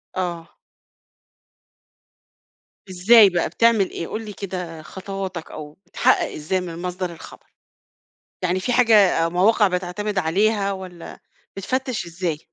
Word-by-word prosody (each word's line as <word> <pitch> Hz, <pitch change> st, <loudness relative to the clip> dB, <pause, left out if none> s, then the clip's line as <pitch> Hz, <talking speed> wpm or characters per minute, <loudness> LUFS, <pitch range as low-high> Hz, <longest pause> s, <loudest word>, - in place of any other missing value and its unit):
آه. 175 Hz, -3 st, -4 dB, 2.4 s
إزاي 200 Hz, +4 st, +6 dB
بقى 175 Hz, -3 st, -1 dB
بتعمل 220 Hz, +1 st, +3 dB
إيه؟ 165 Hz, -, -6 dB
قُل 220 Hz, +1 st, -5 dB
لي 210 Hz, -, -8 dB
كده 180 Hz, -5 st, -6 dB
خطواتك 190 Hz, -1 st, -7 dB
أو 150 Hz, -1 st, -9 dB
بتحقق -, -, +1 dB
إزاي 170 Hz, +5 st, -2 dB
من 170 Hz, -1 st, -7 dB
مصدر 180 Hz, 0 st, -4 dB
الخبر؟ 165 Hz, -, -13 dB, 1.0 s
يعني 180 Hz, +1 st, 0 dB
في 245 Hz, -, -1 dB
حاجة 215 Hz, -9 st, +4 dB
مواقع 200 Hz, +5 st, +3 dB
بتعتمد 185 Hz, +3 st, -3 dB
عليها 200 Hz, +4 st, +1 dB
والّا 185 Hz, -3 st, -9 dB, 0.4 s
بتفتش 255 Hz, 0 st, -3 dB
إزاي؟ 170 Hz, -2 st, -3 dB
185 Hz, 115 wpm, -22 LUFS, 175-205 Hz, 2.4 s, إزاي